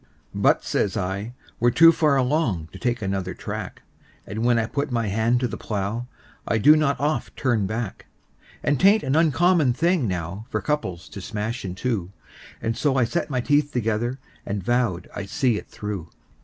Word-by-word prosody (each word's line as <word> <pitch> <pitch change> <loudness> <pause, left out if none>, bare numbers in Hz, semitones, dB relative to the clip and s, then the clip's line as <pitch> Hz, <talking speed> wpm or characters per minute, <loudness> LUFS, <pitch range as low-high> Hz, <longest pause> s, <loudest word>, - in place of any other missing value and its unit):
"But," - - +3
says 100 - 0
I, 100 +5 -3 0.2
"we're 120 - +4
too 165 +7 +7
far 155 -3 +2
along 125 - 0
to - - -10
take 120 -2 -1
another 95 -1 -2
track, - - -6 0.4
And 110 +2 -4
when 120 0 +3
I 115 - +1
put 140 +6 -2
my 115 -2 0
hand 115 +4 +2
to 125 - +1
the - - -7
plow 105 +3 -3 0.4
I 115 - +2
do 150 +8 +7
not 140 -3 +1
oft 150 +2 -1
turn 120 -7 +1
back; 110 -1 -4 0.6
And 145 -3 +1
'tain't 200 +3 +5
an 135 0 0
uncommon 160 -2 +4
thing 170 -1 +1
now 90 +4 -4
for - - -1
couples 95 - -2
to 100 - -8
smash 110 +5 -4
in 90 -2 -5
two;" 105 -4 -2 0.5
And 115 0 0
so 140 +1 +1
I 130 - +4
set 155 +8 -1
my 130 -3 0
teeth 145 +2 +2
together, 120 0 -1 0.3
and 100 -1 -4
vowed 115 -6 0
I'd 100 -1 -5
see 125 0 +1
it - - -7
through. 100 -6 -6
120 Hz, 185 wpm, -24 LUFS, 100-140 Hz, 0.6 s, too